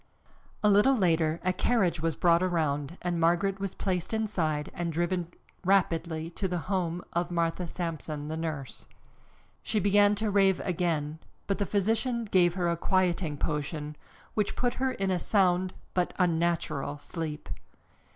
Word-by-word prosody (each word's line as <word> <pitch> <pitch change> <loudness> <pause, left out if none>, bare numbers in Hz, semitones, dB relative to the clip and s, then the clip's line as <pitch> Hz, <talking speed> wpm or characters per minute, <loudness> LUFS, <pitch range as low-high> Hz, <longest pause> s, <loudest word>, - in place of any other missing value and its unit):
A - - +5
little 210 +7 +5
later 165 -6 +2
a 185 0 +2
carriage 185 -6 +1
was 165 -2 0
brought 170 +1 +4
around 160 -3 0
and 175 -1 -1
Margaret 175 +4 +2
was 195 -1 -3
placed 185 +2 -1
inside 165 -9 -1
and 170 -1 -2
driven 175 +1 -1 0.4
rapidly 170 -4 +1
to 190 +3 -2
the 180 -1 -2
home 175 -1 -2
of 175 0 0
Martha 170 0 -1
Sampson, 160 -3 -4
the 155 - -3
nurse. 155 -5 -4 0.7
She 215 - 0
began 205 +1 +4
to 215 0 -1
rave 195 -2 +4
again, 160 -4 -1 0.3
but 200 - -1
the 200 - 0
physician 225 +4 0
gave 180 -4 +3
her 180 -2 0
a 170 - +1
quieting 175 -4 +1
potion, 150 0 -3 0.4
which 210 -2 0
put 245 -1 0
her 260 0 0
in 195 -5 -1
a 180 - +1
sound 185 -1 +2 0.2
but 180 -1 0
unnatural 170 -4 0
sleep. 155 0 -5
175 Hz, 150 wpm, -29 LUFS, 165-195 Hz, 0.7 s, A